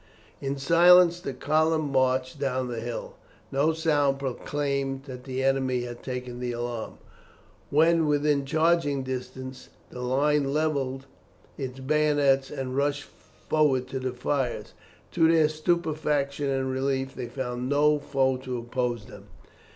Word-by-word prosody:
In 140 0 -2
silence 175 +4 +6
the 175 - -4
column 155 +3 +1
marched 130 0 +1
down 130 -2 -1
the 120 -2 -4
hill. 120 +1 -6 0.3
No 145 +4 +2
sound 150 -4 +1
proclaimed 135 0 -2
that 130 -2 -9
the 130 0 -3
enemy 130 -2 +1
had 120 -1 -7
taken 125 -1 -5
the 125 -1 -3
alarm. 120 -1 -5 0.7
When 160 +2 +4
within 145 -1 +2
charging 155 -1 +1
distance, 130 0 -6 0.2
the 125 - -7
line 140 +2 +1
levelled 140 -3 -1 0.5
its 135 -2 -6
bayonets 145 -1 +2
and 135 -3 -4
rushed 145 +1 0
forward 140 -5 -1
to 130 - -3
the 130 -1 -3
fires. 125 0 -2 0.4
To 165 0 +4
their 160 -2 +5
stupefaction 155 -3 -1
and 135 -1 -1
relief, 135 0 -1
they 120 - -5
found 125 0 -4
no 150 +1 +3
foe 135 -2 +1
to 130 -1 -5
oppose 120 -2 -2
them. 100 -1 -13
135 Hz, 135 wpm, -26 LUFS, 130-150 Hz, 0.7 s, silence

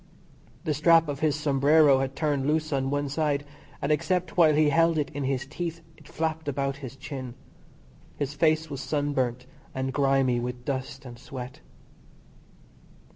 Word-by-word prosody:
The 155 - 0
strap 165 +2 +5
of 145 -2 -4
his 155 -2 +2
sombrero 145 -1 +4
had 135 0 -2
torn 145 -3 0
loose 155 0 0
on 135 -1 0
one 145 0 -1
side, 145 0 -1 0.4
and 140 - +1
except 180 +4 0
while 160 -4 +5
he 150 0 +4
held 165 +2 +3
it 145 -2 -1
in 145 -2 -3
his 135 0 -1
teeth 165 +3 -5
it 150 - -18
flapped 160 -1 -3
about 140 -1 -1
his 135 -3 -8
chin. 130 -2 -7 0.8
His 145 0 -2
face 160 +1 +2
was 140 -3 -6
sunburnt 130 -4 -1 0.3
and 130 0 -2
grimy 135 -3 +2
with 125 0 -5
dust 135 0 -4
and 120 -2 -10
sweat. 125 0 -8
145 Hz, 160 wpm, -27 LUFS, 135-155 Hz, 0.8 s, strap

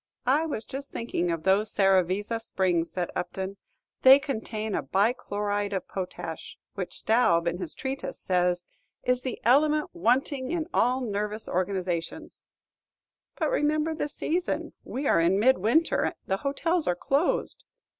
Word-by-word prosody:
"I 290 +6 +3
was 230 -8 -4
just 275 +1 -7
thinking 205 -7 -2
of 165 -2 -2
those 195 +3 +2
Serravezza 195 +3 +2
springs," 180 -6 0
said 180 -2 -3
Upton; 190 +2 -4 0.4
"they 265 +1 +9
contain 220 -6 -4
a - - 0
bi 200 - +2
chloride 205 -3 -2
of 190 - -3
potash, 185 -2 -6 0.2
which - - -5
Staub, 215 -7 +3
in 170 +1 -1
his 175 -5 -4
treatise, 270 +1 -4
says, 180 -1 +1 0.4
'is 250 0 +1
the 255 -2 -4
element 300 +5 +3
wanting 260 - +1
in 335 -1 -1
all 250 +2 +2
nervous 210 -1 -3
organizations.'" 180 -2 -3 0.9
"But - - 0
remember 310 -5 +1
the 295 - -3
season, 345 +5 -2
we 275 +3 -4
are 165 - +4
in 180 +4 +3
mid 260 +2 +4
winter; 260 - +2
the 190 - 0
hotels 320 - 0
are 180 - +2
closed." 280 - 0
215 Hz, 145 wpm, -27 LUFS, 185-270 Hz, 0.9 s, they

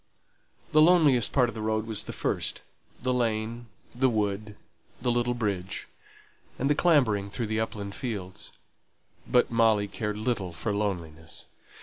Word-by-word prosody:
The 155 - +6
loneliest 155 -8 +5
part 125 -3 +4
of - - -5
the 110 - -6
road 110 0 0
was 110 -2 -3
the - - -5
first - - -2 0.4
the 130 0 +1
lane, 115 0 -1 0.3
the 130 +2 +3
wood, 105 -1 -1 0.4
the 120 0 +1
little 120 0 +1
bridge, 100 -5 -2 0.7
and 135 +3 +1
the - - +6
clambering 125 - +3
through 100 +4 -3
the 110 +1 -1
upland 100 -2 -3
fields. 100 -8 -5 0.8
But 125 -1 +3
Molly 110 -3 +3
cared 105 0 -3
little 105 -5 -1
for 105 +6 -2
loneliness. 85 -6 -4
110 Hz, 145 wpm, -28 LUFS, 100-120 Hz, 0.8 s, The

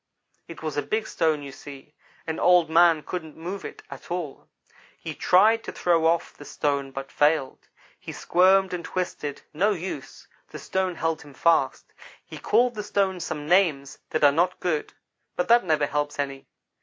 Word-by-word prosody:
"It 165 -1 -11
was 155 -2 -4
a - - +2
big 220 +6 -2
stone, 155 -6 0
you 140 - -8
see, 140 +1 -12 0.3
and 160 -1 -4
Old 175 -3 +4
man 165 -2 +5
couldn't 160 -4 -6
move 180 +5 -6
it - - -9
at - - -10
all. 170 -6 -5 0.5
He - - -6
tried 220 +5 +4
to - - -5
throw 165 -2 +2
off 170 +1 0
the - - -12
stone 140 -1 -2
but 135 0 -8
failed. 145 -2 +1 0.3
He - - -8
squirmed 190 +1 +3
and 175 -1 -4
twisted 165 -5 -4
no 200 +7 +2
use 175 -6 -7 0.2
the - - -8
stone 190 -2 -2
held 165 -1 -2
him 145 -2 -14
fast. 170 +4 +1 0.3
He - - -10
called 245 0 +2
the 215 - -4
stone 195 -2 0
some 150 -3 -5
names 155 -6 +2
that 155 - -1
are 145 - +7
not 175 +5 0
good; 160 -4 -2 0.4
but 180 - -1
that 235 +1 +6
never 155 -4 +1
helps 145 +1 -2
any. 135 -1 -4
165 Hz, 180 wpm, -25 LUFS, 145-180 Hz, 0.5 s, are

